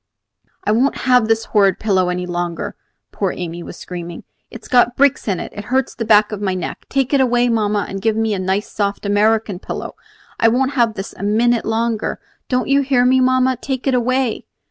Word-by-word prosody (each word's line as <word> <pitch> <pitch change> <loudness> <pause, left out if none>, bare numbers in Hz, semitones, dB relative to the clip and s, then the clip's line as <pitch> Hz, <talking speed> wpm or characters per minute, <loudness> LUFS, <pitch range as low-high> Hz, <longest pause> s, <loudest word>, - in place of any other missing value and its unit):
"I - - +1
won't 250 +6 +2
have 250 -3 +4
this 225 0 +1
horrid 200 -3 +3
pillow 190 -4 +1
any 180 0 -2
longer," 175 -1 -4 0.4
poor 195 -3 -2
Amy 175 -1 -5
was - - -9
screaming. 175 -1 -7 0.3
"It's - - -11
got 245 -1 +3
bricks 280 -2 +2
in 190 -4 0
it. - - -7
It 205 - -7
hurts 260 +2 0
the 230 - -4
back 210 -1 +4
of 210 -1 -5
my 190 -2 -1
neck. 185 - -6
Take 270 0 0
it 275 - +4
away, 245 -1 +2
mamma, 210 -3 0
and 195 0 -6
give 220 +1 +1
me 220 -1 0
a 195 - -2
nice 190 +3 -1
soft 200 -1 -3
American 210 -1 +1
pillow. - - -6 0.5
I 225 - +4
won't 260 +4 +2
have 235 -5 +1
this 195 - -6
a - - -12
minute 230 +3 +2
longer. 225 0 -1 0.3
Don't 250 -1 0
you 275 +1 +3
hear 260 -2 +2
me, 260 +1 +4
mamma! 255 0 +2
Take 260 -2 -3
it 270 - +2
away!" 255 -1 0
225 Hz, 210 wpm, -18 LUFS, 200-250 Hz, 0.5 s, have